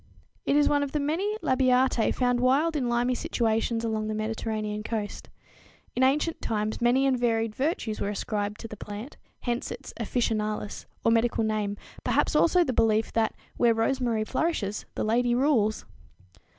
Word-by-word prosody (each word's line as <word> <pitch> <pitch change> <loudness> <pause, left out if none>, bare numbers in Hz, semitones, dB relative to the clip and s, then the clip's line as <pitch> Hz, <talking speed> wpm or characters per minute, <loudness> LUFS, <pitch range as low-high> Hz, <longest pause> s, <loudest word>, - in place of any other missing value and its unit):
It 275 - +3
is 295 0 +5
one 290 -1 +3
of 285 -1 -3
the 300 - +1
many 355 +9 -1
Labiatæ 255 -2 +3
found 245 -1 +2
wild 280 +6 +3
in 255 -5 0
limy 240 +1 +1
situations 225 -1 0
along 215 -1 -1
the 215 - -2
Mediterranean 215 -1 -3
coast. 210 -2 -4 0.7
In 250 - 0
ancient 295 +5 +2
times 215 0 -2
many 250 +3 +3
and 260 -2 +2
varied 225 -2 +1
virtues 260 - -2
were 200 - 0
ascribed 205 0 -3
to 230 - -6
the 215 - -8
plant, 210 +6 -8 0.2
hence 240 0 -2
its - - -8
"officinalis" 215 -2 -2 0.2
or 230 - +5
medical 230 0 +2
name, 210 -2 -1 0.3
perhaps - - +1
also 355 +1 +5
the 260 - -2
belief 220 -1 +2
that 225 -1 +1 0.2
"where 235 -2 +4
rosemary 230 -1 +1
flourishes, 215 - -1
the - - -1
lady 240 +2 +2
rules!" 240 -6 +2
235 Hz, 165 wpm, -27 LUFS, 215-260 Hz, 0.7 s, is